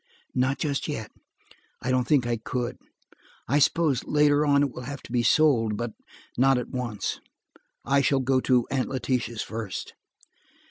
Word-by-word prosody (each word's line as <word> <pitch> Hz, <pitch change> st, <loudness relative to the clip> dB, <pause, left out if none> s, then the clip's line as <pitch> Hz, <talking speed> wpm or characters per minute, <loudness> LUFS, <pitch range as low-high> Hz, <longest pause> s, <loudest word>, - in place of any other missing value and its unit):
"Not 130 Hz, +2 st, +1 dB
just 140 Hz, -3 st, -2 dB
yet; 115 Hz, -8 st, -5 dB, 0.7 s
I 130 Hz, -, -2 dB
don't 125 Hz, -2 st, +1 dB
think 140 Hz, -5 st, +3 dB
I 120 Hz, 0 st, 0 dB
could. 120 Hz, +2 st, -4 dB, 0.7 s
I 140 Hz, +5 st, +3 dB
suppose, 150 Hz, -3 st, +2 dB
later, 150 Hz, 0 st, +3 dB
it 140 Hz, -2 st, +3 dB
will -, -, -8 dB
have 140 Hz, +2 st, -7 dB
to -, -, -12 dB
be 120 Hz, -1 st, +2 dB
sold, 120 Hz, -6 st, +3 dB
but 120 Hz, 0 st, -3 dB, 0.5 s
not 135 Hz, 0 st, +5 dB
at 125 Hz, -, -4 dB
once. 120 Hz, -6 st, -3 dB, 0.7 s
I 140 Hz, 0 st, +3 dB
shall 140 Hz, 0 st, +2 dB
go 130 Hz, 0 st, +2 dB
to 125 Hz, -2 st, +2 dB
Aunt 130 Hz, -2 st, 0 dB
Letitia's 125 Hz, -3 st, -2 dB
first." 110 Hz, -3 st, -6 dB
130 Hz, 155 wpm, -26 LUFS, 120-140 Hz, 0.7 s, not